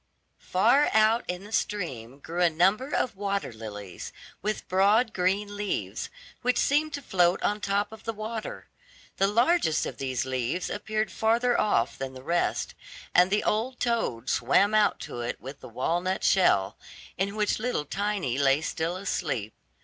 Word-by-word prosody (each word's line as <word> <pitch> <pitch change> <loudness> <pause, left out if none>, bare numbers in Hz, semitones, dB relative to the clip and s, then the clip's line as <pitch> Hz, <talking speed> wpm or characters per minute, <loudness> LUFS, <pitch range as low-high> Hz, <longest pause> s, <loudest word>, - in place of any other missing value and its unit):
Far 240 +10 +3
out 220 +2 +4
in 180 +1 -4
the 205 - -12
stream 135 - -2
grew 170 +4 -4
a 175 - +5
number 195 - +2
of 250 -6 0
water 200 - -2
lilies, 105 -4 -8 0.3
with 215 0 -3
broad 205 +5 +3
green 200 +3 0
leaves, 205 0 -3 0.3
which 250 0 +1
seemed 300 +2 +2
to 285 - -4
float 180 -4 +2
on 210 - +1
the 210 - -5
top 200 +1 0
of 220 -1 -12
the 225 - -2
water. 220 +1 -6 0.5
The 195 - +3
largest 235 - +2
of - - -6
these 130 -2 -1
leaves 130 +6 -2
appeared 215 0 -2
farther 235 +2 +2
off 160 - +1
than 135 0 -4
the 130 - -10
rest, 170 +4 0 0.4
and 180 +1 +6
the 210 +2 +1
old 235 +4 -1
toad 225 - -1
swam 140 - +3
out 215 -1 +3
to - - -6
it 120 +1 -4
with 135 +2 -9
the - - -11
walnut 175 +10 -1
shell, 100 - +3 0.4
in 200 +2 -1
which 210 -1 +1
little 220 -10 -1
Tiny 195 - -1
lay 140 +1 +3
still 165 +2 -2
asleep. 150 - -2
195 Hz, 165 wpm, -27 LUFS, 140-215 Hz, 0.5 s, and